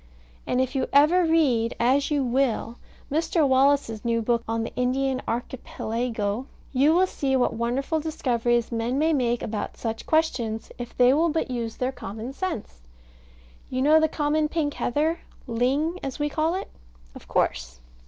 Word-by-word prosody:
And 250 - +1
if 260 +1 0
you 265 -2 0
ever 315 +6 +5
read 270 -9 +2
(as 265 +4 +2
you 290 -2 +1
will) 245 -2 0 0.3
Mr. 320 0 +2
Wallace's 265 -4 +2
new 230 -1 +1
book 235 +1 +1
on 225 0 -1
the - - -6
Indian 260 +1 0
Archipelago, 230 -1 -3 0.3
you 285 +5 +4
will 370 +2 +5
see 275 -7 -1
what 255 - +2
wonderful 255 +7 -1
discoveries 240 -6 0
men 235 +3 -1
may 320 +2 +2
make 240 -4 0
about 210 -1 -4
such 225 -1 -4
questions 240 -9 0
if 240 -1 -7
they 250 +1 +6
will 325 +4 +3
but 320 -4 -1
use 230 -2 -3
their 255 +1 -1
common 225 +1 -7
sense. 270 - -5 0.9
You 255 0 -1
know 310 +2 +6
the 315 - +3
common 300 0 0
pink 295 -3 -1
heather 310 +7 0 0.3
ling, 275 +9 0
as 270 -2 -5
we 295 -1 -1
call 320 +3 0
it? 385 - -5 0.4
Of - - -13
course. - - -1
260 Hz, 165 wpm, -25 LUFS, 235-300 Hz, 0.9 s, they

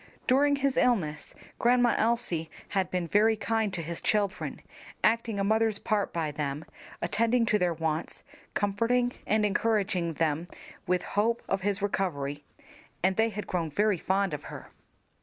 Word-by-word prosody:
During 285 +3 +4
his 275 -1 0
illness 160 -12 +1 0.2
Grandma 245 0 +4
Elsie 220 -8 +1 0.2
had 190 -2 0
been 180 -2 -2
very 215 +5 +4
kind 220 0 0
to 170 - -3
his 170 +1 -5
children, 205 -3 0 0.4
acting 225 -2 +2
a - - +1
mother's 220 +1 +2
part 205 -1 0
by 160 -3 -2
them, 145 0 -3 0.4
attending 230 +1 +2
to 215 -2 +2
their 175 -2 +1
wants, 160 0 -2 0.3
comforting 230 +5 +1 0.2
and 215 0 +3
encouraging 195 -5 +1
them 160 +1 0 0.4
with 180 0 +1
hope 225 +3 0
of 195 - 0
his 200 +1 -1
recovery, 145 -8 -2 0.6
and 190 +1 +3
they 225 +2 +3
had 210 -1 -5
grown 170 -3 -2
very 205 +3 +1
fond 195 -1 0
of 150 - -5
her. - - -9
200 Hz, 155 wpm, -28 LUFS, 170-225 Hz, 0.6 s, During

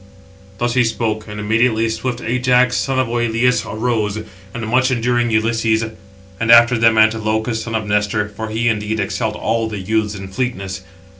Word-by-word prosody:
Thus 120 +3 -1
he 125 0 +3
spoke; 110 -2 -2
and 105 0 -7
immediately 110 +2 +1
swift 120 +2 -3
Ajax, 125 +1 +2
son 135 -1 -1
of 130 - +2
Oïleus, 120 +1 +1
arose, 110 -2 -1 0.3
and 115 0 -5
much 130 +3 +2
enduring 120 -1 +1
Ulysses; 110 0 +1 0.6
and 115 +1 +2
after 120 +1 +7
them 115 -1 +3
Antilochus, 110 +1 +1
son 115 0 -4
of 110 -1 -2
Nestor; 105 +1 0
for 110 +2 -6
he, 115 +2 -1
indeed, 110 -1 -1
excelled 105 +2 -2
all 115 0 -1
the 105 - -5
youths 105 +2 -1
in 95 -1 -8
fleetness. 95 -4 -4
110 Hz, 165 wpm, -18 LUFS, 110-120 Hz, 0.6 s, after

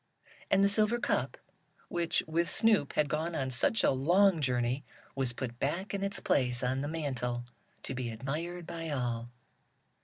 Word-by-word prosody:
And 195 0 +4
the - - +6
silver 215 +3 +2
cup, 370 - -1 0.5
which, 170 -1 0
with 165 +2 +1
Snoop, 220 - +3
had 150 - +2
gone 160 +4 -2
on 130 -3 -1
such 130 - +1
a - - +5
long 170 +6 +4
journey, 125 0 +1 0.3
was 135 -3 0
put 120 0 -5
back 180 +9 -2
in 200 0 -2
its 200 0 -2
place 125 -2 +1
on 130 +2 0
the 145 - -2
mantle, 130 -6 -2 0.4
to - - -3
be 125 -2 -3
admired 155 +9 -4
by 165 -1 -5
all. 120 -4 -2
145 Hz, 165 wpm, -31 LUFS, 125-175 Hz, 0.5 s, the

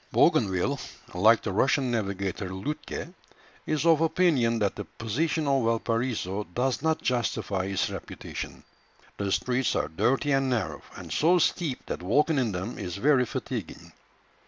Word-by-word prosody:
Bougainville, 100 +9 +3 0.3
like 110 +6 +5
the 100 - -2
Russian 130 +5 +2
navigator 100 -4 -2
Lütke, 150 - -5 0.5
is 155 0 0
of 165 -2 +5
opinion 155 -9 +3
that 105 -3 0
the 105 - -5
position 150 +8 -1
of 135 -2 +2
Valparaiso 115 -3 -1
does 125 -1 0
not 160 0 0
justify 105 -6 0
its 95 -1 0
reputation. - - -7 0.5
The 100 -1 -2
streets 125 +4 +1
are - - 0
dirty 135 - +1
and 135 -1 +2
narrow, 120 -3 -1
and - - -7
so 170 +4 +4
steep 165 -5 0
that - - -4
walking 145 - +2
in 120 -4 +1
them 95 +5 -4
is 90 - -4
very 130 +3 +3
fatiguing. - - -5
120 Hz, 145 wpm, -27 LUFS, 100-145 Hz, 0.5 s, like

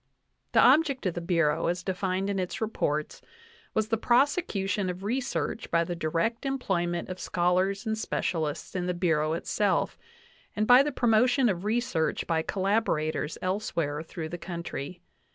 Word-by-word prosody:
The - - +5
object 285 -7 +4
of 185 - +1
the 175 - -4
Bureau, 165 -3 +1
as 175 +1 -1
denned 190 0 -1
in 200 -1 -1
its 180 -1 -3
reports, 155 -9 -2 0.5
was 220 0 +1
the 225 - +2
prosecution 225 - +1
of 180 +1 -5
research 245 +1 -2
by 170 0 +3
the 175 +1 -4
direct 170 +8 -1
employment 185 -11 -1
of 185 0 -6
schol 180 +1 +1
ars 195 +3 -1
and 220 0 0
specialists 160 -9 -2
in 180 -1 -1
the 180 - -1
Bureau 160 -3 +1
itself, 195 +4 0 0.6
and 215 - +1
by 245 +3 +8
the 295 +1 0
promotion 245 +1 +3
of 185 -1 -2
research 220 -7 0
by 160 -1 +1
collaborators 185 -6 0
elsewhere 170 -6 -1
through 160 0 -6
the 175 - -6
country. 170 -1 -6
185 Hz, 155 wpm, -28 LUFS, 170-220 Hz, 0.6 s, by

